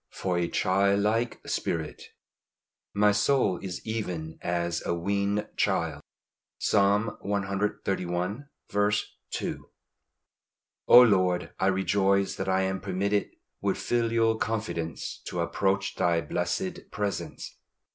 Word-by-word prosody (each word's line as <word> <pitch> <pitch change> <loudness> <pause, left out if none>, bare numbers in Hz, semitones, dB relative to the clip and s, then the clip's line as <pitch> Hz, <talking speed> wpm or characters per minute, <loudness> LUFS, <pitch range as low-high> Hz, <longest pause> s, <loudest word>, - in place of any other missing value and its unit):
FOR 90 -2 -2
A 85 - +1
CHILD 100 +3 +2
LIKE 115 +3 0
SPIRIT. 80 -2 -3 0.9
"My 105 0 +4
soul 105 -2 +2
is 90 -3 -6
even 90 -8 -4
as 85 0 -1
a 85 - -1
weaned 100 +3 0
child." - - 0 0.6
Psalm 100 +2 +2
cxxxi. 100 - -1 0.3
2. - - -4 1.2
O 125 - +10
Lord, 95 -5 +2
I 95 - +2
rejoice 95 0 +2
that - - -2
I 95 0 +3
am 95 -1 -1
permitted 100 +2 0 0.3
with - - 0
filial 115 -1 +1
confidence 105 -8 -3
to 90 - -4
approach 95 +3 0
Thy 85 -1 +2
blessed 180 - -3
presence. 105 -1 -4
100 Hz, 105 wpm, -28 LUFS, 90-105 Hz, 1.2 s, O